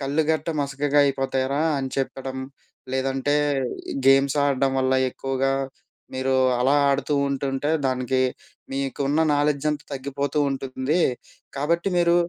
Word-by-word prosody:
కళ్ళు 140 +3 +1
గట్ట 155 0 -1
మసకగా 140 +1 0
అయిపోతాయిరా 135 +1 0 0.2
అని 135 - -2
చెప్పడం. 135 0 -3 0.6
లేదంటే 135 +2 0 0.7
గేమ్స్ 135 +1 +5
ఆడడం 135 -1 +2
వల్ల 130 0 +2 0.2
ఎక్కువగా 135 +1 -1 0.6
మీరు 130 0 0 0.2
అలా 130 +3 +3 0.2
ఆడుతూ 140 +2 0
ఉంటుంటే 140 +1 -1 0.2
దానికి 130 0 0 0.5
మీకున్న 140 +2 -1
నాలెడ్జ్ 145 0 +1
అంతా 145 -2 -4
తగ్గిపోతూ 140 +2 -3
ఉంటుంది. 135 +4 -1 0.6
కాబట్టి 170 +6 0
మీరు 170 -1 +4
135 Hz, 110 wpm, -24 LUFS, 135-145 Hz, 0.7 s, గేమ్స్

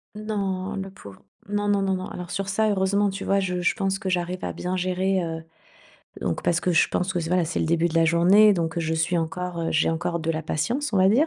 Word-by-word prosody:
Non, 200 -2 -3
le 195 -1 -5
pauvre, 100 - -13 0.3
non, 205 0 -1
non, 200 -1 +2
non, 195 -1 +1
non. 185 - -4
Alors 180 0 -7
sur 195 +1 -3
ça, 215 +2 +2
heureusement, 200 +1 +2
tu 195 +1 -5
vois, 195 0 +2
je 180 -2 -2
je 180 - +1
pense 195 -1 0
que 195 -2 -4
j'arrive 180 0 -2
à - - -2
bien 180 +1 -3
gérer, 185 0 0
heu 165 -1 -5 0.8
donc 85 - -2
parce 170 -1 +2
que 180 - 0
je 165 - +4
pense 185 +1 -1
que 175 - +1
c 165 -1 -3
voilà, 180 -1 +3
c'est 165 - -2
le - - +1
début 170 +1 +2
de 160 - -7
la 165 0 +4
journée, 185 +6 +6
donc 170 -2 -1
je 160 -1 -1
suis 160 +2 +1
encore 170 +1 -3
j'ai - - +2
encore 170 +1 -2
de 165 - -1
la 160 0 -2
patience, 235 - -2
on - - +1
va 185 - +5
dire. 260 +10 +4
185 Hz, 255 wpm, -24 LUFS, 170-195 Hz, 0.8 s, journée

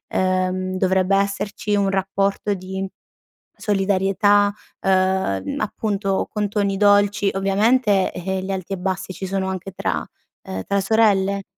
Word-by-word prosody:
uhm, 185 0 0
dovrebbe 190 0 +2
esserci 200 +1 -1
un 200 -1 +2
rapporto 195 +1 0
di 190 +1 -5 0.7
solidarietà, 205 0 +2 0.3
uhm, 185 - +1
appunto, 205 -2 -1
con 210 -1 -1
toni 200 -2 0
dolci. 205 0 +4
Ovviamente, 200 +1 +2
eh, 190 +1 -3
gli 195 - -4
alti 190 0 -4
e - - -2
bassi 185 +1 -3
ci 190 +2 -6
sono 190 0 -1
anche 190 +1 -5
tra, 95 - -2 0.4
uhm, 95 0 -5
tra 200 - +1
sorelle. 200 -2 +2
195 Hz, 130 wpm, -21 LUFS, 185-205 Hz, 0.7 s, dolci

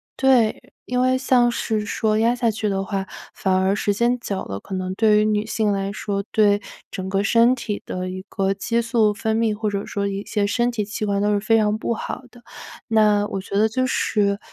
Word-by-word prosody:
对， 250 -5 +2
因 250 0 0
为 255 0 +3
像 255 -2 +3
是 220 -2 -1
说 215 0 0
压 230 +2 +3
下 240 -2 +1
去 215 0 -2
的 195 -1 -1
话， 195 -1 -3 0.3
反 190 - -1
而 190 +1 +2
时 205 - 0
间 240 +3 +2
久 200 -5 -4
了， 95 0 -6
可 190 - -7
能 185 0 -3
对 210 +1 +4
于 210 - +2
女 210 -1 +1
性 220 -1 0
来 195 0 -1
说， 200 -1 -3
对 205 -1 +3 0.3
整 190 -2 -5
个 195 +1 0
身 235 +4 +4
体 210 -4 -4
的 185 0 -4
一 185 0 -6
个 195 0 0
激 230 +4 -1
素 230 -2 +2
分 220 +1 -2
泌， 225 -1 +1
或 210 0 -2
者 200 0 -3
说 200 0 -2
一 200 0 -4
些 205 -1 -1
身 240 +4 +1
体 225 -4 -2
器 215 +1 -5
官 200 -1 0
都 205 +1 +1
是 205 - +2
非 225 +2 +3
常 210 -1 +2
不 230 - -1
好 - - -5
的。 240 0 -18 0.5
那 210 -2 +3
我 195 - -4
觉 200 +1 -4
得 215 +2 +4
就 255 +3 -1
是， 200 -5 +1
210 Hz, 245 characters per minute, -22 LUFS, 200-230 Hz, 0.5 s, 对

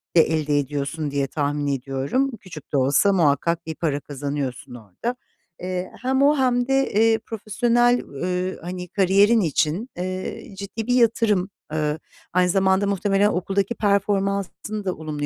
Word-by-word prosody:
de 165 - +8
elde 150 -2 +1
ediyorsun 145 +2 -3
diye 140 -1 0
tahmin 145 0 -1
ediyorum. 140 - -1
Küçük 155 -7 -12
de - - +3
olsa 140 +9 +3
muhakkak 170 0 +2
bir 160 0 -5
para 150 -4 -1
kazanıyorsun 140 -3 -5
orada. 115 - -5 0.5
Eee, 180 0 -3
hem 265 +1 +1
o 290 +2 +5
hem 245 -2 +2
de, 270 0 +1
eee, 225 +2 +4
profesyonel, 240 +3 +2
ııı, 180 +5 -3
hani, 180 +1 -6
kariyerin 200 +5 +4
için, 165 - 0
eee, 185 +2 -5
ciddi 200 +3 -5
bir 245 - +2
yatırım. 225 -5 +2 0.2
Iıı, 150 0 -1 0.3
aynı 180 0 +3
zamanda 190 +1 +2
muhtemelen 200 +1 +2
okuldaki 195 +3 -1
performansını 200 0 -1
da 185 - 0
olumlu 150 -2 -4
185 Hz, 145 wpm, -23 LUFS, 150-210 Hz, 0.5 s, de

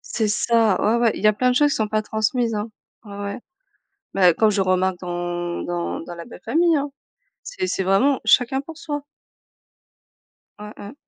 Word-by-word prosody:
C'est 220 -2 +1
ça! 220 -1 +2
Ouais, 225 +3 +2
ouais, 230 -2 +4
il - - -7
y - - +6
a 215 - +5
plein 250 +4 +1
de 250 - +1
choses 295 +2 +4
qui - - 0
sont 215 -1 0
pas 215 0 -1
transmises, 220 +2 0
hein. 210 +1 -3 0.3
Ouais, 205 -2 -10
ouais. 200 +2 -5 0.7
Mais 180 -3 +5
comme 215 +5 +3
je 200 -1 +1
remarque 185 0 +1
dans 175 -1 -3
dans 175 0 -3
dans 175 +1 -8
la 170 - -8
belle-famille, 330 +7 0
hein. 285 +1 -2 0.5
C'est - - -4
c'est 195 - -1
vraiment 250 +9 +3
chacun 255 +2 +4
pour 310 +3 -9
soi. 295 -3 -5 1.6
Ouais, 210 0 -9
ouais. 205 +6 -9
215 Hz, 190 wpm, -22 LUFS, 190-250 Hz, 1.6 s, y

